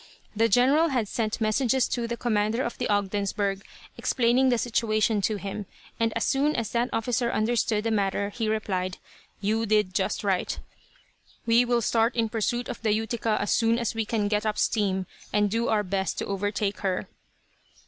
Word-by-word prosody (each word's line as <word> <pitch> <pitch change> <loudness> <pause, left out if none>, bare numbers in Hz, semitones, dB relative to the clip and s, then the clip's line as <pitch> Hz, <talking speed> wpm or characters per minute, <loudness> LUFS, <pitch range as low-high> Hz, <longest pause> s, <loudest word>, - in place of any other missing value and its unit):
The 225 +2 +3
general 275 +9 +4
had 245 -6 0
sent 215 +1 -2
messages 235 +3 +2
to 235 -2 -1
the 235 0 -3
commander 220 +1 0
of 235 - -3
the - - -1
Ogdensburgh, 200 -1 0 0.4
explaining 250 +2 +3
the 245 - +3
situation 220 -2 +1
to 215 +2 0
him, 200 0 -5 0.3
and 225 -1 +2
as 230 - 0
soon 290 +3 +1
as 225 -3 -2
that 240 +1 0
officer 235 +1 0
understood 220 -1 +1
the 225 - 0
matter 200 -1 0
he 225 0 -2
replied, 185 -4 -2 0.4
"You 220 +2 0
did 210 -3 +2
just 190 +2 -1
right." 190 -3 0 0.9
"We 235 +1 +4
will 240 -1 +1
start 230 +2 +2
in 225 -2 +1
pursuit 240 +2 -1
of - - -6
the 220 -2 +2
Utica 225 0 -1
as 205 - -1
soon 230 0 +3
as 235 -2 -1
we 225 -1 -1
can 210 -1 0
get 210 0 0
up 215 -1 -1
steam, 190 -4 +1 0.3
and 210 -1 +2
do 230 +2 0
our 210 -1 +2
best 190 -2 -2
to - - -2
overtake 205 +1 -2
her." 190 -2 -1
220 Hz, 180 wpm, -26 LUFS, 205-235 Hz, 0.9 s, general